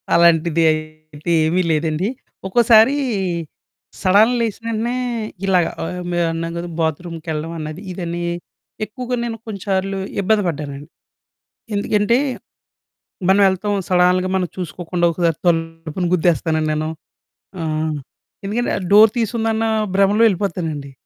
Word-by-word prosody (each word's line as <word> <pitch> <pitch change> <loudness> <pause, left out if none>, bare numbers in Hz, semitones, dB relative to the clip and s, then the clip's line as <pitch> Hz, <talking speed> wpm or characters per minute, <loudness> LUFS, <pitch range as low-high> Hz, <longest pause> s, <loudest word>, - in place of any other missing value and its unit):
అలాంటిది 170 -1 +4
అయితే 155 0 -5
ఏమీ 175 +4 +2
లేదండి. 155 +3 0 0.4
ఒక్కోసారి 230 +4 +5 1.1
సడన్ 205 +5 +5
లేసిన 230 0 -3
వెంటనే 230 +2 -1 0.5
ఇలాగ 185 -3 +3 0.2
ఆహ్, 180 +2 -4
మే 175 - -1
మేమున్నాం 165 0 -1
గదా! 170 +1 -4
బాత్‌రూమ్‌కెళ్ళడం 160 0 -3
అన్నది, 155 +2 -6
ఇదని, 175 -1 -4 0.6
ఎక్కువగా 250 +4 -4
నేను 230 -1 -3
కొన్నిసార్లు 195 -2 -2 0.2
ఇబ్బంది 210 +2 +2
పడ్డానండి. 145 -3 -5 0.9
ఎందుకంటే 205 +3 +2 1.1
మనం 195 +1 +5
ఎళ్తాం 205 +2 -1
సడన్‌గా 180 0 +3
మనం 185 -1 0
చూసుకోకుండా 175 0 -2
ఒకసారి 165 -2 0
తలుపును 165 +1 -1
గుద్దేస్తానండి 160 -2 +1
నేను. 155 +1 -1 0.7
ఆహ్, 155 -1 -1 0.5
ఎందుకంటే 230 +5 -1 0.2
డోర్ 210 +1 +8
తీసుందన్న 225 -1 0 0.3
భ్రమలో 200 +3 +4
ఎళ్ళిపోతానండి. 165 -7 -3
180 Hz, 105 wpm, -20 LUFS, 160-205 Hz, 1.1 s, డోర్